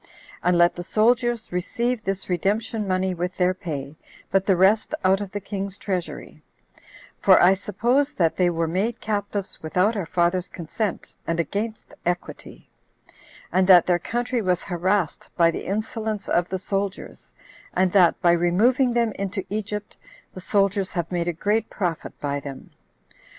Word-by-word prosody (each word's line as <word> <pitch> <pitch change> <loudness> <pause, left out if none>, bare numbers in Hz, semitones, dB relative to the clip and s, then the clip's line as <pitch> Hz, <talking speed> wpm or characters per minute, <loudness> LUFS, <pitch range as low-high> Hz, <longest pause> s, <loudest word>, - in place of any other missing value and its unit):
And 180 0 +2
let 175 0 +5
the 175 - -5
soldiers 235 +4 +1
receive 235 +6 -1
this 195 0 -3
redemption 210 +4 -1
money 185 0 0
with 180 +1 -4
their 180 0 +3
pay, 150 -5 -6 0.3
but 195 0 +2
the 195 - +5
rest 210 - +3
out 190 +2 +4
of 200 -2 -5
the 205 - -3
king's 195 0 -5
treasury: 185 -4 -5 0.8
for 190 -2 +6
I 180 +2 +6
suppose 240 +8 0
that 170 - +1
they 180 -1 +3
were 165 -1 -1
made 205 +8 -1
captives 205 -2 -3
without 185 +7 +1
our 195 -6 -3
father's 175 +1 +1
consent, 185 +4 -4
and 165 0 -1
against 210 +7 -3
equity; 175 0 -4 0.8
and 185 0 +2
that 180 -3 +8
their 175 -1 +2
country 240 +5 -2
was 180 -3 0
harassed 185 -1 -1
by 170 -1 +5
the - - -6
insolence 215 +1 -3
of 175 +1 +1
the 190 - -2
soldiers, 195 +1 -4 0.4
and 185 0 +2
that, 180 -4 +4
by 175 - +6
removing 220 +10 +3
them 235 -2 +2
into 195 0 -3
Egypt, 210 0 -4 0.4
the 185 - -8
soldiers 195 0 +1
have 170 -2 -3
made 175 -1 -1
a - - +2
great 210 +6 0
profit 175 -5 -4
by 145 0 -2
them. 140 -1 -9
190 Hz, 160 wpm, -24 LUFS, 175-210 Hz, 0.8 s, that